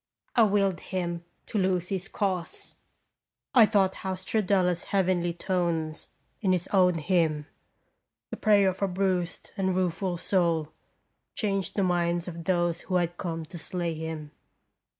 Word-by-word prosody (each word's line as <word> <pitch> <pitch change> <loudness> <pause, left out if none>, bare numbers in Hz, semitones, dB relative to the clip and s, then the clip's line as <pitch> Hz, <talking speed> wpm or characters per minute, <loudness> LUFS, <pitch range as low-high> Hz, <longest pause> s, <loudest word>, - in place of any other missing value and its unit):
I 235 - +6
willed 200 -4 +3
him 175 -2 -3 0.2
to 215 - -2
lose 185 -2 +1
his 190 -1 -3
cause. 185 -5 -3 0.8
I 235 -5 +8
thought 195 -3 +3
how 190 -1 -4
Stradella's 185 -3 +1
heavenly 185 -3 +1
tones 170 -3 -1 0.3
in 190 -3 +3
his 180 -1 -1
own 180 -3 +4
hymn, 160 -3 +1 0.9
the - - -4
prayer 205 -3 +4
of 185 - -5
a 200 - +3
bruised 185 -2 -1
and 190 -1 +1
rueful 180 0 0
soul, 170 -4 +1 0.7
changed 195 -5 -1
the 200 - +2
minds 175 -1 +1
of 170 -1 -7
those 175 -2 +1
who 185 - -3
had 175 -1 +1
come 165 -2 -4
to 170 +2 -9
slay 170 0 -2
him. 160 -1 -5
180 Hz, 145 wpm, -28 LUFS, 170-190 Hz, 0.9 s, I